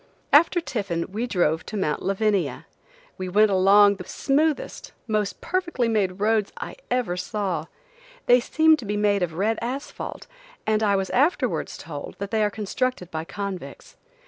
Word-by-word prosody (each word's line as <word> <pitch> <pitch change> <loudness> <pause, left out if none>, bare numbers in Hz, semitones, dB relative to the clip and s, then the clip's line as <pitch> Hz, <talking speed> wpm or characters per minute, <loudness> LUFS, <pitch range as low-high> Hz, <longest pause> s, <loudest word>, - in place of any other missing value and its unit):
After 335 +4 +6
tiffin 200 - -3
we 225 +5 -2
drove 165 -7 +1
to 215 - -4
mount 150 -6 -1
Lavania. 195 -1 0 0.5
We 185 0 -3
went 210 +3 +4
along 200 +1 +6
the 180 - -7
smoothest, 300 +2 -1
most 210 -2 -1
perfectly 345 -10 -1
made 200 -4 0
roads 215 0 +1
I - - -7
ever 245 -8 0
saw. 180 -3 -2 0.6
They 245 +1 +6
seemed 315 +5 +3
to 240 - -7
be 205 +1 -2
made 205 -1 +2
of 170 -3 -2
red 215 +5 0
asphalt, 260 +4 -5 0.4
and 215 0 +1
I 205 -2 +3
was 195 -1 -1
afterwards 280 -2 +1
told 145 -3 -8
that 200 0 -5
they 220 -1 +2
are 210 - +2
constructed 210 -1 -3
by 160 0 -4
convicts. 200 -1 -7
210 Hz, 160 wpm, -24 LUFS, 190-245 Hz, 0.6 s, After